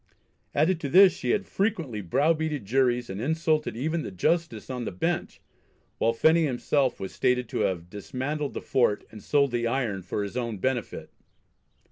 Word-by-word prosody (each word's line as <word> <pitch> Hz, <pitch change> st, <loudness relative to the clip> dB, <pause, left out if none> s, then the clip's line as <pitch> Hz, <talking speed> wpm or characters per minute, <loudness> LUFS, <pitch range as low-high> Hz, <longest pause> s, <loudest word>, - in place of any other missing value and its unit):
Added 160 Hz, +4 st, +2 dB
to 145 Hz, -, -4 dB
this 185 Hz, +3 st, +7 dB
she -, -, -4 dB
had 205 Hz, -1 st, +1 dB
"frequently 170 Hz, -, -1 dB
browbeated 150 Hz, -, +1 dB
juries 125 Hz, +1 st, +1 dB
and 95 Hz, +2 st, -5 dB
insulted 155 Hz, -2 st, 0 dB
even 160 Hz, +6 st, -1 dB
the -, -, -5 dB
justice 155 Hz, -, -1 dB
on 125 Hz, -2 st, -4 dB
the -, -, -3 dB
bench," 90 Hz, -, -2 dB, 0.6 s
while 115 Hz, -, +3 dB
Phenney 160 Hz, +8 st, +4 dB
himself 130 Hz, 0 st, 0 dB
was 95 Hz, -, -6 dB
stated 125 Hz, -1 st, +1 dB
to -, -, -3 dB
have 85 Hz, -2 st, -1 dB
dismantled 130 Hz, -, -4 dB
the -, -, -3 dB
fort, 120 Hz, -5 st, +1 dB
and 110 Hz, -, -10 dB
sold 140 Hz, +1 st, +2 dB
the 120 Hz, -1 st, 0 dB
iron 115 Hz, -6 st, -1 dB
for 95 Hz, +3 st, -3 dB
his 100 Hz, -, -6 dB
own 115 Hz, -4 st, -2 dB
benefit. 125 Hz, +3 st, -3 dB
130 Hz, 170 wpm, -27 LUFS, 110-155 Hz, 0.6 s, this